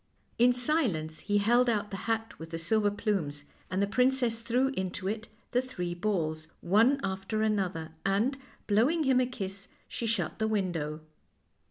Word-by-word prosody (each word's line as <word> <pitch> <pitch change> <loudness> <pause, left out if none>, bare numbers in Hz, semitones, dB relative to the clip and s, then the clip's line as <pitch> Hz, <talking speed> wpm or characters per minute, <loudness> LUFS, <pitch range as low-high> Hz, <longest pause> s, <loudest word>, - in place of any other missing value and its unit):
In 245 +1 +7
silence 240 - 0
he 205 0 0
held 240 +4 +4
out 210 -2 0
the - - -3
hat 225 0 -1
with 160 0 -8
the 165 - -4
silver 205 +5 +2
plumes, 180 -9 -2 0.2
and 190 +2 +1
the - - +4
princess 250 +1 +2
threw 245 +3 +1
into 190 -6 -3
it 220 +2 -3 0.2
the 250 - +3
three 180 -9 -4
balls, 165 -5 -1
one 225 +10 +4
after 195 +3 -1
another, 185 -7 -1
and, 205 +8 +2 0.3
blowing 250 +11 +3
him 265 -2 +4
a 250 - +1
kiss, 195 -5 -6 0.2
she 230 - -4
shut 215 -5 -1
the 220 - +1
window. 170 -8 -1
210 Hz, 165 wpm, -30 LUFS, 180-240 Hz, 0.3 s, In